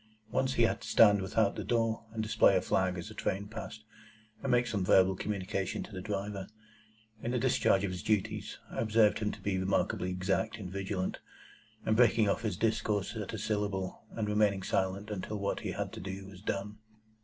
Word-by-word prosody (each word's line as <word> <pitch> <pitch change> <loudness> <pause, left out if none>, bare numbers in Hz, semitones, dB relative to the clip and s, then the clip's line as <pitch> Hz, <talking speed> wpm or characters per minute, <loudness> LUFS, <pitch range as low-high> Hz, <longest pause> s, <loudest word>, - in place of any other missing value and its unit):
Once 130 0 +1
he 120 - +3
had 115 - +1
to - - -8
stand 105 -3 +6
without 100 +2 +1
the 105 - -4
door, 115 +1 0
and 110 -1 -2
display 100 -2 +4
a - - +1
flag 95 -1 +1
as 85 - -6
a - - -8
train 100 +2 -2
passed, 110 0 -7 0.6
and - - -1
make 120 0 +4
some 105 -5 -1
verbal 95 +1 +5
communication 95 -1 -2
to - - -11
the 95 -2 -6
driver. 100 -1 -3 0.7
In 120 - -3
the 125 - 0
discharge 100 -4 +3
of 100 - -1
his 90 - -5
duties, 105 -3 -1
I - - -4
observed 110 -1 +4
him 105 -1 0
to - - -9
be 95 -2 -1
remarkably 95 -1 0
exact 95 +5 -1
and 95 -5 -7
vigilant, 95 -1 -2 0.7
breaking 110 -1 +4
off 100 - +1
his 105 -6 -2
discourse 110 -2 0
at - - -4
a - - -3
syllable, 100 -3 -2
and 110 -2 -2
remaining 105 -2 +2
silent 95 +3 -1
until 105 +1 -4
what 100 0 -1
he - - -4
had - - -4
to - - -7
do 95 +2 -6
was 95 -1 -12
done. 105 0 -3
100 Hz, 200 wpm, -31 LUFS, 95-110 Hz, 0.7 s, stand